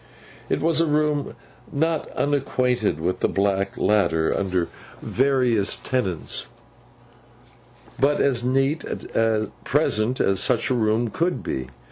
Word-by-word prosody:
It - - 0
was 165 +1 +2
a 165 - +2
room, 150 -1 0 0.4
not 160 +2 0
unacquainted 125 - 0
with 90 +3 -1
the - - +2
black 100 0 0
ladder 85 -6 +2
under 95 -3 0 0.3
various 125 -6 +1
tenants; 100 -11 -3 1.5
but 145 +2 +3
as 125 -4 +1
neat, 135 +4 +1
at 110 -2 -2
present, 110 +4 +1
as 95 -1 +2
such 125 +3 +2
a - - +4
room 115 0 +1
could 175 +2 -1
be. 65 -1 -3
120 Hz, 120 wpm, -23 LUFS, 100-140 Hz, 1.5 s, a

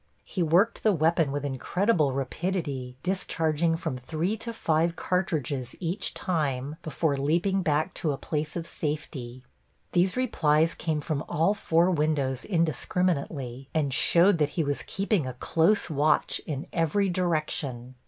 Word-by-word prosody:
He 185 - -4
worked 175 +7 +3
the 215 - +3
weapon 165 -2 +2
with 145 0 -3
incredible 150 - +1
rapidity, 135 -2 -3
discharging 165 -3 0
from 130 -6 -4
three 165 - -2
to 230 +2 -5
five 165 -5 +1
cartridges 150 -10 -1
each 180 +3 -1
time 150 -5 -1
before 155 -2 0
leaping 170 +8 +1
back 155 -2 0
to 155 - +1
a 140 - -3
place 150 +1 -3
of 170 -2 -3
safety. 135 -6 -5 0.5
These 180 +4 +2
replies 160 -10 +2
came 155 -3 -2
from 150 -1 -2
all 170 +4 +2
four 175 -3 +2
windows 145 -5 0
indiscriminately, 155 - -1
and 145 -4 +1
showed 170 +5 +5
that 150 -1 +2
he 165 - +3
was 145 -1 -1
keeping 195 - 0
a 130 - -4
close 165 +10 +2
watch 155 -1 +1
in 145 -2 -3
every 170 +4 +1
direction. 155 -8 -2
160 Hz, 145 wpm, -27 LUFS, 140-180 Hz, 0.5 s, showed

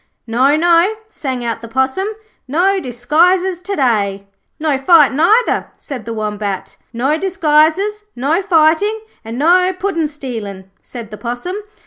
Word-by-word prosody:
'No, 255 +5 +2
no,' 340 +5 +3
sang 260 - -4
out 230 -1 -3
the 230 - -8
Possum. 265 - 0 0.4
'No 370 +8 +2
disguises 345 +8 +1
to 400 +2 -4
day.' 200 - 0 0.3
'No 300 -3 0
fighting, 290 -1 +5
either,' 435 +9 +3
said 255 -6 -8
the 230 - -4
Wombat. 210 -2 -4 0.2
'No 270 +7 0
disguises, 380 +3 +1
no 290 +9 0
fighting, 370 +4 +2 0.2
and 225 +1 -6
no 360 +6 +4
puddin' 365 -5 -1
stealing,' 220 -10 -7
said 230 -4 -10
the 210 - -7
Possum. 245 +10 -4
300 Hz, 135 wpm, -16 LUFS, 240-360 Hz, 0.4 s, fighting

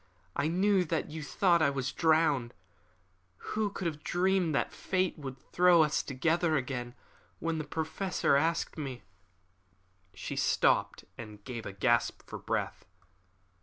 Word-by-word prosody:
I 155 - +1
knew 190 +3 +3
that 160 -1 -2
you 160 0 -5
thought 170 +3 +2
I 150 - +4
was 135 -2 -2
drowned. 155 -7 +2 0.8
Who 215 - -2
could 195 -2 -6
have 155 -3 -3
dreamed 180 -3 +1
that - - 0
fate 185 -1 -1
would 135 -2 -6
throw 175 +3 +4
us 150 -1 +1
together 160 +4 +1
again! 125 -3 -3 0.4
When 165 0 -2
the - - -2
Professor 160 +2 0
asked 160 +2 0
me 130 -4 -5 0.6
" 95 -1 -39 0.3
She - - -5
stopped - - +2
and 105 -3 -9
gave 120 -2 -6
a - - -5
gasp 120 +4 +1
for - - -7
breath. - - -3
155 Hz, 145 wpm, -30 LUFS, 130-175 Hz, 0.8 s, I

